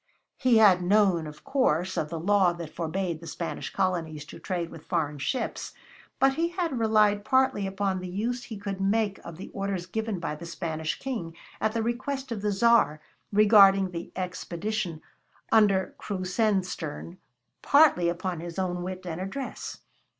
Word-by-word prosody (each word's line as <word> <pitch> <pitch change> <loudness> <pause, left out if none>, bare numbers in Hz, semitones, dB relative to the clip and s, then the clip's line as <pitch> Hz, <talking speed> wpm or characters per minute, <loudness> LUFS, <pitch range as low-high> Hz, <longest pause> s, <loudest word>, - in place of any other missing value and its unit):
He 255 -3 +4
had 200 -5 +6
known, 185 -3 +3
of 150 0 -11
course, 185 - +1
of 150 - -1
the 165 - -4
law 190 0 +3
that 170 -2 -8
forbade 170 0 -2
the 165 - -9
Spanish 170 - -5
colonies 165 -6 -1
to - - -11
trade 175 -3 -3
with 160 -2 -12
foreign 150 -5 -1
ships, 255 - -3 0.4
but 270 0 +4
he 330 +4 +1
had 340 -7 -2
relied 215 -2 +3
partly 260 -5 +2
upon 190 -1 -1
the 180 0 -6
use 235 +6 -2
he 220 - -7
could 195 -1 -5
make 200 0 +1
of 170 -2 -9
the 185 - -8
orders 195 -3 -3
given 220 +1 -3
by 170 - -3
the 160 +3 -8
Spanish 160 -2 -3
King 220 -12 -5 0.3
at 215 0 +1
the 230 -1 0
request 260 +3 -3
of 220 -3 -3
the 210 0 0
Tsar 200 -7 +4 0.3
regarding 200 -2 +6
the 170 -1 -6
expedition 180 -1 -3 0.5
under 200 -4 +4
Krusenstern, 185 -4 -2 0.4
partly 280 - +5
upon 175 0 -3
his 170 +1 -7
own 180 -2 -1
wit 185 +1 -6
and 170 0 -4
address. 255 +8 -6
190 Hz, 165 wpm, -27 LUFS, 170-220 Hz, 0.5 s, had